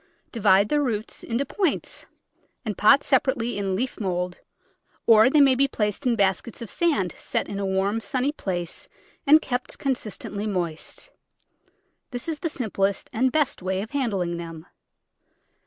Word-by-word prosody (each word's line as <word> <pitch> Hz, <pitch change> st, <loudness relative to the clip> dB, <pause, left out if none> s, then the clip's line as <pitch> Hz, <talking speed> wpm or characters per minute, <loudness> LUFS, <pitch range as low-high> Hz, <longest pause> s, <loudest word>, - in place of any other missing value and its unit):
Divide 200 Hz, -3 st, +4 dB
the 295 Hz, 0 st, +2 dB
roots 225 Hz, -6 st, -3 dB
into 240 Hz, +4 st, -1 dB
points 365 Hz, +3 st, -2 dB, 0.6 s
and 210 Hz, -2 st, -2 dB
pot 215 Hz, +9 st, +5 dB
separately 255 Hz, -4 st, +1 dB
in 195 Hz, -2 st, -1 dB
leaf 250 Hz, +6 st, -2 dB
mould, 180 Hz, -3 st, -2 dB, 0.7 s
or 225 Hz, +1 st, +7 dB
they 295 Hz, +2 st, +5 dB
may 275 Hz, -2 st, +6 dB
be 275 Hz, +2 st, +3 dB
placed 210 Hz, +1 st, -1 dB
in 240 Hz, -, +3 dB
baskets 200 Hz, +2 st, 0 dB
of 230 Hz, -5 st, -7 dB
sand 290 Hz, -, +1 dB
set -, -, -2 dB
in 200 Hz, -, -4 dB
a 200 Hz, -, -1 dB
warm, 195 Hz, +3 st, 0 dB
sunny 265 Hz, +3 st, 0 dB
place 175 Hz, -, -4 dB, 0.4 s
and 310 Hz, +2 st, +7 dB
kept 250 Hz, -1 st, -3 dB
constantly 215 Hz, -5 st, -3 dB
moist; 175 Hz, -6 st, -4 dB, 1.0 s
this 245 Hz, +2 st, -6 dB
is 320 Hz, -2 st, -2 dB
the 330 Hz, -, -2 dB
simplest 200 Hz, -8 st, -1 dB
and 255 Hz, +3 st, +2 dB
best 300 Hz, -7 st, +1 dB
way 190 Hz, +1 st, -1 dB
of 220 Hz, -, -10 dB
handling 195 Hz, -11 st, -1 dB
them. 165 Hz, -1 st, -8 dB
220 Hz, 155 wpm, -25 LUFS, 190-265 Hz, 1.0 s, or